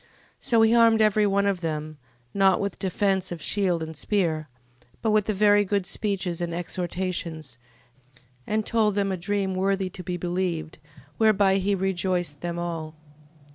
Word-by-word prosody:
15:11. -, -, -30 dB, 0.3 s
So 230 Hz, -3 st, +2 dB
he 225 Hz, +1 st, +4 dB
armed 230 Hz, -1 st, +5 dB
every 215 Hz, -1 st, +3 dB
one 200 Hz, 0 st, +1 dB
of 195 Hz, -3 st, 0 dB
them, 155 Hz, -2 st, -4 dB, 0.3 s
not 195 Hz, -2 st, +4 dB
with 200 Hz, -2 st, -3 dB
defence 190 Hz, 0 st, 0 dB
of 175 Hz, -, -5 dB
shield 180 Hz, -2 st, 0 dB
and 160 Hz, 0 st, -7 dB
spear, 160 Hz, -4 st, -1 dB, 0.5 s
but 220 Hz, -, +2 dB
with 210 Hz, -1 st, +2 dB
very 205 Hz, 0 st, +4 dB
good 200 Hz, -1 st, -1 dB
speeches, 185 Hz, -4 st, -1 dB
and 170 Hz, -1 st, -2 dB
exhortations, 170 Hz, -5 st, -4 dB, 0.9 s
and 215 Hz, 0 st, 0 dB
told 215 Hz, -3 st, +1 dB
them 200 Hz, -1 st, 0 dB
a -, -, 0 dB
dream 195 Hz, +2 st, -1 dB
worthy 190 Hz, 0 st, 0 dB
to 185 Hz, -, -8 dB
be 180 Hz, +1 st, -3 dB
believed, 175 Hz, -2 st, -3 dB, 0.4 s
whereby 200 Hz, -3 st, +4 dB
he 195 Hz, +1 st, +1 dB
rejoiced 180 Hz, -5 st, -1 dB
them 175 Hz, 0 st, -3 dB
all. 165 Hz, -2 st, -4 dB
190 Hz, 160 wpm, -25 LUFS, 170-205 Hz, 0.9 s, armed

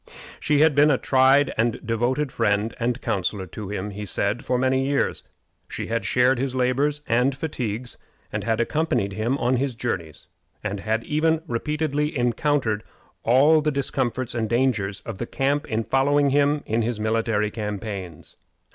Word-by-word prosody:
She 150 Hz, -1 st, +2 dB
had 160 Hz, -1 st, +5 dB
been 145 Hz, +2 st, +5 dB
a 135 Hz, -, +4 dB
tried 135 Hz, +2 st, +4 dB
and 115 Hz, +1 st, +1 dB
devoted 125 Hz, +5 st, 0 dB
friend 105 Hz, 0 st, 0 dB
and 120 Hz, +1 st, -1 dB
counselor 95 Hz, 0 st, -1 dB
to 100 Hz, +2 st, -8 dB
him, 105 Hz, 0 st, -4 dB
he 105 Hz, +1 st, -6 dB
said, 100 Hz, +5 st, -1 dB
for 125 Hz, -, 0 dB
many 130 Hz, +1 st, +2 dB
years. 140 Hz, +1 st, 0 dB, 0.4 s
She -, -, -5 dB
had 115 Hz, -2 st, -1 dB
shared 125 Hz, +3 st, +3 dB
his 130 Hz, 0 st, -2 dB
labors 140 Hz, +4 st, +1 dB
and 125 Hz, +4 st, +2 dB
fatigues, 125 Hz, -6 st, -4 dB, 0.3 s
had 115 Hz, -1 st, -1 dB
accompanied 120 Hz, -6 st, 0 dB
him 115 Hz, +6 st, -1 dB
on 125 Hz, -1 st, +1 dB
his 130 Hz, -1 st, -1 dB
journeys, 95 Hz, -10 st, -4 dB, 0.4 s
and 100 Hz, -1 st, -3 dB
had 110 Hz, +3 st, -1 dB
even 160 Hz, +3 st, +1 dB
repeatedly 150 Hz, +3 st, -1 dB
encountered 120 Hz, -2 st, 0 dB, 0.4 s
all 145 Hz, +6 st, +5 dB
the 150 Hz, -, +1 dB
discomforts 130 Hz, -3 st, -2 dB
and 115 Hz, -2 st, -2 dB
dangers 115 Hz, -5 st, 0 dB
of -, -, -7 dB
the 120 Hz, -, -3 dB
camp 140 Hz, +2 st, 0 dB
in 110 Hz, 0 st, 0 dB
following 140 Hz, +3 st, +2 dB
him 145 Hz, +1 st, +2 dB
in 115 Hz, +2 st, 0 dB
his 115 Hz, -1 st, -2 dB
military 110 Hz, -1 st, 0 dB
campaigns. 100 Hz, -6 st, -6 dB
125 Hz, 160 wpm, -24 LUFS, 110-140 Hz, 0.4 s, had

